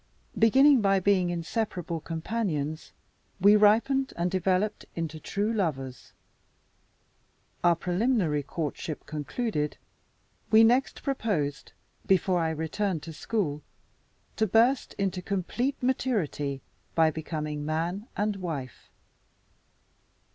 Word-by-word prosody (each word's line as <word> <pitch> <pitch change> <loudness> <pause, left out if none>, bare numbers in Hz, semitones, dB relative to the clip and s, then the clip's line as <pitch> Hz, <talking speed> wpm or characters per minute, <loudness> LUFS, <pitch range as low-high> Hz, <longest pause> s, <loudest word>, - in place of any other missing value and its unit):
Beginning 265 +4 +6
by 195 -1 +3
being 185 -2 +2
inseparable 175 -1 -3
companions, 160 -3 -3 0.5
we 200 +3 +7
ripened 230 +6 +3
and 175 +1 0
developed 190 +3 0
into 160 -2 -4
true 205 +7 -1
lovers. 135 - -3 1.5
Our 175 -1 +5
preliminary 180 - +1
courtship 155 +1 -5
concluded, 150 - -3 0.7
we 220 +1 +7
next 245 +4 +2
proposed 195 - -2 0.3
(before 185 -1 +3
I 165 -1 +1
returned 160 +2 -2
to 165 - -7
school) 155 -5 -2 0.8
to 220 - +2
burst 235 +7 +3
into 190 -2 -1
complete 200 +9 -1
maturity 185 - -1 0.3
by 160 -1 +4
becoming 150 -1 -4
man 170 +8 -2
and 205 0 0
wife. 150 -9 -6
180 Hz, 100 wpm, -28 LUFS, 155-220 Hz, 1.5 s, we